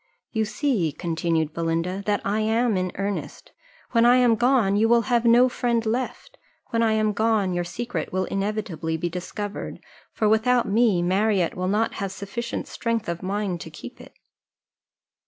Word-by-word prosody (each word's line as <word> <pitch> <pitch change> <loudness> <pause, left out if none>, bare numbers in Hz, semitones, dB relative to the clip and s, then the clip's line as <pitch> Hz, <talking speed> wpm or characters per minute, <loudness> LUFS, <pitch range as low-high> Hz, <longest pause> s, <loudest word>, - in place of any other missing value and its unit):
"You 220 -2 0
see," 210 - 0
continued 165 -1 -1
Belinda, 165 +3 -1
"that 205 -1 +1
I 205 +2 0
am 225 +1 +1
in 185 -1 -1
earnest: 200 +1 -4 0.4
when 230 -1 +4
I 240 +1 +6
am 250 -2 +5
gone, 240 -4 +3
you 220 +2 +3
will 235 0 +4
have 240 -1 +1
no 240 +2 +6
friend 235 -2 -1
left; 255 - -3 0.3
when 230 - +1
I 225 -1 +3
am 215 -1 +1
gone, 215 -3 +1
your 175 0 -1
secret 230 +8 -4
will 185 0 0
inevitably 195 -5 -2
be 175 +2 -2
discovered; 200 +4 -5 0.3
for 215 - 0
without 230 +3 +3
me, 205 -4 +3
Marriott 190 0 +1
will 185 0 -3
not 210 +4 +1
have 195 -1 -2
sufficient 215 +5 -5
strength 230 -2 -2
of 170 0 -3
mind 190 -2 -2
to - - -7
keep - - -11
it." - - -15
210 Hz, 170 wpm, -24 LUFS, 185-230 Hz, 0.4 s, I